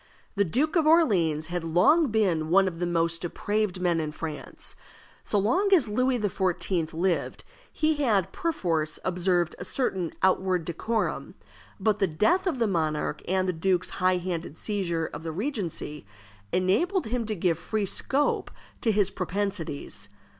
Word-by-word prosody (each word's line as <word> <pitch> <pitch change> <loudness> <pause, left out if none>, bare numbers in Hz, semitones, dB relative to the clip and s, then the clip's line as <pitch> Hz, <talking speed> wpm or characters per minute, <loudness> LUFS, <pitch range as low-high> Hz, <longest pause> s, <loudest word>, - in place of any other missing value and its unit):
The 200 - +2
Duke 270 - 0
of 320 -3 +3
Orleans 185 - +3
had 175 -2 -2
long 185 - +4
been 185 -9 +1
one 190 +2 +5
of 165 -3 -4
the 175 - 0
most 165 -1 +1
depraved 205 +2 -1
men 175 -2 +1
in 155 -1 -2
France. 155 -1 0 0.5
So 210 - 0
long 255 - +2
as 290 -10 +2
Louis 255 +4 +1
XIV. 180 -5 -1
lived 175 +2 -1 0.3
he 310 -1 +1
had 215 - +1
perforce 165 - -1
observed 180 -1 +1
a - - -4
certain 185 - -1
outward 185 -2 +2
decorum; 220 +7 -2 0.4
but 215 -2 +1
the 195 - +3
death 325 - +2
of 325 -7 0
the 235 - +2
monarch, 160 -6 -1
and 185 0 +1
the 185 - +1
duke's 180 +2 0
high 185 0 +4
handed 175 -3 -4
seizure 175 -6 -1
of 150 - -7
the 165 0 -4
regency, 175 - -4 0.4
enabled 225 - +1
him 230 0 -2
to 215 - -2
give 170 -3 0
free 210 +4 -1
scope 275 +8 0 0.3
to 225 - +2
his 205 -2 +2
propensities. 180 - -3
185 Hz, 155 wpm, -27 LUFS, 165-220 Hz, 0.5 s, one